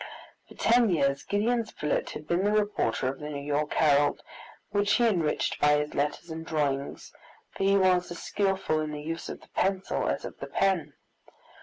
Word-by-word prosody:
For -, -, -15 dB
ten 235 Hz, -1 st, +4 dB
years 140 Hz, -5 st, +1 dB
Gideon 230 Hz, +4 st, 0 dB
Spilett 150 Hz, -8 st, -2 dB
had 150 Hz, -, -8 dB
been 175 Hz, +2 st, +1 dB
the 205 Hz, -, +2 dB
reporter 210 Hz, -10 st, 0 dB
of 135 Hz, -, -6 dB
the 150 Hz, -, -6 dB
New 140 Hz, -1 st, -5 dB
York 150 Hz, +1 st, -1 dB
Herald, 145 Hz, -1 st, +3 dB, 0.5 s
which 205 Hz, 0 st, +2 dB
he 240 Hz, -, +3 dB
enriched 170 Hz, -9 st, 0 dB
by 150 Hz, 0 st, +5 dB
his 150 Hz, 0 st, -2 dB
letters 150 Hz, +4 st, -2 dB
and 160 Hz, 0 st, -5 dB
drawings, 145 Hz, -4 st, -2 dB, 0.4 s
for 195 Hz, -, -2 dB
he 195 Hz, 0 st, +4 dB
was 185 Hz, -2 st, +3 dB
as 175 Hz, -, -6 dB
skilful 195 Hz, -5 st, 0 dB
in 155 Hz, -1 st, -4 dB
the 150 Hz, -, -5 dB
use 165 Hz, +1 st, -5 dB
of -, -, -7 dB
the -, -, -19 dB
pencil 190 Hz, 0 st, 0 dB
as -, -, -2 dB
of -, -, -9 dB
the -, -, -6 dB
pen. 180 Hz, -7 st, 0 dB
165 Hz, 190 wpm, -28 LUFS, 150-195 Hz, 0.5 s, by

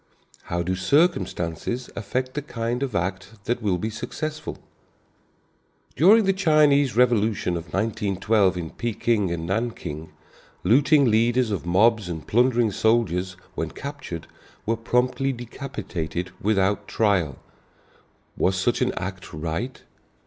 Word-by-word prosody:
How 85 Hz, 0 st, -2 dB
do 90 Hz, +2 st, -1 dB
circumstances 95 Hz, -, 0 dB
affect 130 Hz, +4 st, -3 dB
the 150 Hz, -, -2 dB
kind 120 Hz, -2 st, -3 dB
of 130 Hz, -6 st, -2 dB
act 95 Hz, +3 st, -2 dB
that 120 Hz, +1 st, -1 dB
will 100 Hz, -4 st, +1 dB
be 110 Hz, +5 st, -3 dB
successful? 155 Hz, +8 st, -5 dB, 1.4 s
During 205 Hz, -, +6 dB
the 195 Hz, -, +3 dB
Chinese 150 Hz, -, +4 dB
revolution 110 Hz, -6 st, +2 dB
of 85 Hz, -1 st, -4 dB
1912 100 Hz, +1 st, +1 dB
in 85 Hz, -2 st, -4 dB
Peking 115 Hz, -3 st, 0 dB
and 85 Hz, -1 st, -3 dB
Nanking, 90 Hz, -6 st, -3 dB, 0.5 s
looting 140 Hz, +4 st, +5 dB
leaders 115 Hz, +1 st, +3 dB
of 90 Hz, -4 st, -3 dB
mobs 105 Hz, +2 st, +3 dB
and 80 Hz, -2 st, -5 dB
plundering 120 Hz, -1 st, +3 dB
soldiers 95 Hz, -4 st, +1 dB, 0.2 s
when -, -, -3 dB
captured 140 Hz, -, -7 dB, 0.4 s
were 115 Hz, -, +1 dB
promptly 125 Hz, +3 st, +1 dB
decapitated 115 Hz, -, -5 dB
without 100 Hz, 0 st, +1 dB
trial. 95 Hz, -, +1 dB, 1.0 s
Was 95 Hz, -, +1 dB
such 95 Hz, -, +1 dB
an -, -, +2 dB
act -, -, -6 dB
right? 80 Hz, -, -4 dB
110 Hz, 120 wpm, -24 LUFS, 95-125 Hz, 1.4 s, During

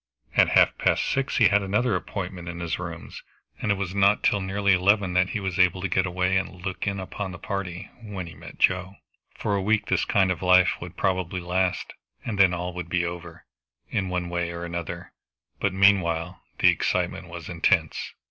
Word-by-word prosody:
At -, -, +5 dB
half -, -, +4 dB
past -, -, +2 dB
six 135 Hz, 0 st, -1 dB
he 115 Hz, -6 st, +6 dB
had 105 Hz, 0 st, +3 dB
another 105 Hz, +3 st, +1 dB
appointment 90 Hz, -2 st, -5 dB
in 85 Hz, 0 st, -6 dB
his 85 Hz, -1 st, -3 dB
rooms, 85 Hz, -2 st, -7 dB, 0.4 s
and 105 Hz, -, +1 dB
it -, -, +3 dB
was 95 Hz, -2 st, -3 dB
not 100 Hz, +1 st, +3 dB
till 100 Hz, -, +2 dB
nearly 100 Hz, +1 st, +1 dB
eleven 95 Hz, 0 st, +3 dB
that 90 Hz, +1 st, +3 dB
he 110 Hz, -, -2 dB
was 95 Hz, -1 st, -3 dB
able 90 Hz, 0 st, +4 dB
to 100 Hz, -, -1 dB
get 95 Hz, +1 st, +1 dB
away 90 Hz, +1 st, +1 dB
and 95 Hz, -1 st, -4 dB
look 95 Hz, +2 st, -3 dB
in 100 Hz, -1 st, -1 dB
upon 95 Hz, +1 st, -5 dB
the 90 Hz, -, -8 dB
party, 95 Hz, -2 st, -5 dB
when 100 Hz, -5 st, -6 dB
he 85 Hz, -, -10 dB
met -, -, -12 dB
Joe. 95 Hz, +1 st, +1 dB, 0.4 s
For 100 Hz, -, -1 dB
a 100 Hz, -, 0 dB
week 105 Hz, +2 st, +1 dB
this -, -, +1 dB
kind 95 Hz, -2 st, +2 dB
of 90 Hz, -, -3 dB
life 90 Hz, 0 st, +5 dB
would 90 Hz, 0 st, -9 dB
probably 95 Hz, -1 st, -1 dB
last, 90 Hz, +1 st, -1 dB, 0.3 s
and 105 Hz, -4 st, -3 dB
then 95 Hz, -2 st, +6 dB
all 90 Hz, 0 st, -3 dB
would 90 Hz, -1 st, -6 dB
be 90 Hz, 0 st, +1 dB
over, 85 Hz, -1 st, -7 dB, 0.5 s
in 95 Hz, -2 st, -1 dB
one 90 Hz, -1 st, -2 dB
way 85 Hz, 0 st, -2 dB
or 85 Hz, 0 st, -5 dB
another, 85 Hz, 0 st, -6 dB, 0.5 s
but 100 Hz, -, +1 dB
meanwhile 95 Hz, -3 st, +2 dB, 0.2 s
the -, -, +5 dB
excitement -, -, -1 dB
was -, -, -8 dB
intense. -, -, 0 dB
95 Hz, 205 wpm, -25 LUFS, 90-100 Hz, 0.5 s, he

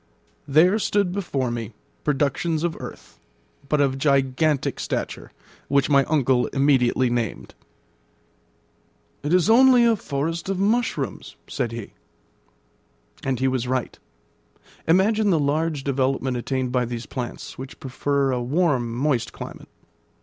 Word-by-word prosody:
There 170 Hz, +9 st, +4 dB
stood 200 Hz, -3 st, +1 dB
before 145 Hz, -10 st, -2 dB
me 115 Hz, -2 st, -5 dB, 0.3 s
productions 150 Hz, +3 st, 0 dB
of 175 Hz, -2 st, -1 dB
earth, -, -, -10 dB, 0.5 s
but 150 Hz, -, +2 dB
of 135 Hz, -2 st, +1 dB
gigantic 140 Hz, +1 st, +1 dB
stature, -, -, -4 dB, 0.4 s
which 140 Hz, +1 st, +2 dB
my 140 Hz, -1 st, +5 dB
uncle 130 Hz, -5 st, +2 dB
immediately 130 Hz, -2 st, +2 dB
named. 120 Hz, -2 st, -3 dB, 1.7 s
"It 145 Hz, -, -3 dB
is 180 Hz, 0 st, +4 dB
only 245 Hz, +1 st, +6 dB
a 230 Hz, -1 st, +4 dB
forest 165 Hz, 0 st, -3 dB
of 195 Hz, -, -1 dB
mushrooms," 200 Hz, -, -1 dB
said 120 Hz, -2 st, -2 dB
he. 115 Hz, -3 st, -7 dB, 1.3 s
And 135 Hz, -2 st, -1 dB
he 130 Hz, -, +2 dB
was 130 Hz, -2 st, -1 dB
right. 130 Hz, -1 st, -2 dB, 0.9 s
Imagine 205 Hz, +5 st, +3 dB
the 175 Hz, -, +3 dB
large 150 Hz, 0 st, 0 dB
development 135 Hz, -1 st, 0 dB
attained 130 Hz, +1 st, -2 dB
by 125 Hz, -1 st, +1 dB
these 120 Hz, 0 st, -5 dB
plants, 125 Hz, -1 st, -6 dB
which 130 Hz, +1 st, -9 dB
prefer 140 Hz, +1 st, 0 dB
a 125 Hz, -1 st, -1 dB
warm, 130 Hz, -3 st, +1 dB
moist 130 Hz, -2 st, 0 dB
climate. -, -, -9 dB
140 Hz, 130 wpm, -23 LUFS, 130-165 Hz, 1.7 s, only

